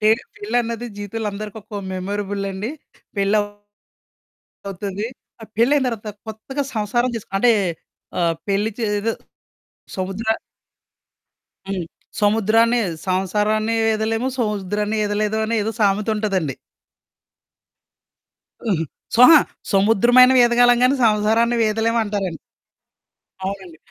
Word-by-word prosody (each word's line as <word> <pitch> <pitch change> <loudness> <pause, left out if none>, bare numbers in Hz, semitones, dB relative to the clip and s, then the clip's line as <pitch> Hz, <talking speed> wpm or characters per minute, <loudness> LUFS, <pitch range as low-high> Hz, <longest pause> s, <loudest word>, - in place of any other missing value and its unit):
Pay 215 - +3 0.3
పెళ్ళన్నది 235 +2 -2
జీవితం‌లో 210 +1 -4
అందరికొక్కో 210 0 -7
మెమరబుల్లండి. 200 +2 -3 0.5
పెళ్లవ్ 205 +1 +2 1.2
అవుతది. 200 +1 -4 0.4
ఆ - - -6
పెళ్లయిన 265 +5 +3
తరవాత 225 -3 -4 0.2
కొత్తగా 265 +6 -4
సంసారం 240 +4 0
చేస్ 225 - -7
అంటే, 240 +5 +4 0.7
ఆహ్, 170 -1 +2
పెళ్లి 205 +3 +1
చే 230 - -1 0.2
ఏదో 225 +2 0 0.9
సముద్ర 190 +4 -4 1.4
హ్మ్. 185 -3 -2 0.4
సముద్రాన్ని 225 +3 +3 0.3
సంసారాన్ని 210 +4 0
వీదలేము, 225 +2 0
సముద్రాన్ని 210 -1 -1
ఈదలేదు 210 +1 0
అనే 230 +1 -1
ఏదో 220 - -1
సామెతుంటదండి. 200 - 0 2.1
అహా! 180 -8 0 0.3
స్వహా 250 +7 +9 0.3
సముద్రమైన 225 +6 +5
వీదగలం 245 0 +5
గానీ, 255 +2 +5
సంసారాన్ని 225 +2 +3
వీదలేవంటారండి. 215 -5 0 1.1
అవునండి. 190 -4 -6
215 Hz, 90 wpm, -21 LUFS, 200-230 Hz, 2.1 s, స్వహా